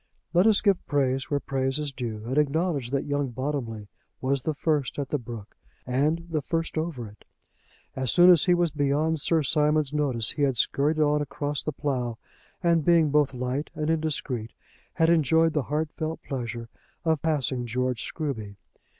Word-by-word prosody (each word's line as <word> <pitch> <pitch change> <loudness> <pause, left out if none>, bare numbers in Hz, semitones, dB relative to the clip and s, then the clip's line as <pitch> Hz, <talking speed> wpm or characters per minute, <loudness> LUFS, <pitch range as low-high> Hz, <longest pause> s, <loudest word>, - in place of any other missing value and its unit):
Let 180 +5 +5
us 215 -2 +5
give 200 -4 +2
praise 135 -2 0
where 145 - +1
praise 135 0 -1
is 150 -2 -3
due, 115 -5 -5
and 125 +3 -2
acknowledge 150 -3 0
that 140 +1 -1
young 145 -1 -1
Bottomley 120 -4 -4 0.3
was 135 +1 0
the 155 - -1
first 150 -3 0
at 140 -2 -3
the 150 - 0
brook, 115 -4 -9 0.3
and 150 +6 0
the 160 -3 -1
first 165 +4 -2
over 155 -8 -3
it. 105 +1 -16 0.7
As 130 -1 -2
soon 180 +1 +7
as 170 -4 +5
he 180 -2 +4
was 175 -2 +1
beyond 150 +2 +1
Sir 160 0 +2
Simon's 150 0 +2
notice, 135 -7 0
he 150 - -5
had 135 -3 +2
scurried 145 +7 +2
on 150 -1 +3
across 145 0 -3
the 155 - -3
plough, 125 -6 -2 0.5
and 170 -2 +3
being 165 -3 +4
both 145 -3 +2
light 125 +4 -2
and 155 +1 0
indiscreet, 145 -8 -2 0.4
had 165 0 +3
enjoyed 160 0 +3
the 150 - +1
heartfelt 155 +1 -3
pleasure 120 -3 -5 0.4
of 160 -3 +2
passing 135 -6 0
George 125 0 -1
Scruby. 115 -10 -4
145 Hz, 175 wpm, -26 LUFS, 130-160 Hz, 0.7 s, soon